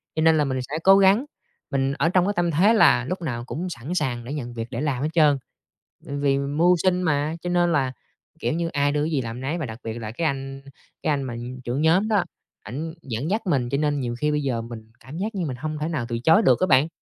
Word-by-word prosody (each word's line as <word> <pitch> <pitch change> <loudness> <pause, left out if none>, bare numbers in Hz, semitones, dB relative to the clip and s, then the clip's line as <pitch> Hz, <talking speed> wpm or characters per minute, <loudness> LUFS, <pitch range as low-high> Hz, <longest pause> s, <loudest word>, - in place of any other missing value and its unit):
cho 160 - 0
nên 160 0 +5
là 150 - +2
mình 130 -1 -1
sẽ 155 - -1
cố 195 0 +7
gắng, 200 +6 +4 0.5
mình 135 0 +1
ở 165 - +1
trong 185 -1 +3
cái 205 - 0
tâm 175 -1 +1
thế 195 +9 +4
là 125 - +5
lúc 180 +5 -4
nào 120 -7 -3
cũng 175 +7 -4
sẵn 160 +3 -5
sàng 125 -7 -1
để 135 +5 -6
nhận 120 -5 -5
việc 115 0 -5
để 120 +3 -3
làm 140 -3 -1
hết 155 - 0
trơn. 150 -4 +4 0.7
Ừm, 140 0 -4
vì 140 -1 +2
mưu 150 +6 +3
sinh 185 -1 +2
mà, 155 -2 0
cho 175 - -3
nên 175 -1 +2
là, 135 -4 +1 0.5
kiểu - - -1
như, 170 0 -1
ai 145 -2 +1
đưa 150 0 0
gì 155 -4 0
làm 115 +1 -6
nấy 145 +6 -2
và 160 - -3
đặc 110 0 -8
biệt 110 - -4
là 110 -1 -5
cái 160 +7 -1
anh 135 0 -4 0.4
cái 155 - +1
anh 140 -2 0
mà 125 -3 -5 0.3
trưởng 125 +5 -2
nhóm 175 +6 +3
đó, 205 -5 +2 0.4
ảnh 155 +8 -5
dẫn 130 +5 -4
dắt 215 +3 0
mình, 130 -8 +1
cho 140 - 0
nên 145 -1 0
nhiều 120 -2 -3
khi 150 +2 +1
bây 150 - 0
giờ 120 -4 -1
mình 115 -1 -10
cảm 145 +5 -10
giác 210 +3 -3
như 180 -4 -1
mình 130 -4 -4
hông 155 +3 -4
thể 155 - -1
nào 145 -8 -2
từ 115 - -2
chối 160 - +5
được - - +4
á 185 - +2
bạn. 135 +2 +5
145 Hz, 270 wpm, -24 LUFS, 130-170 Hz, 0.7 s, cố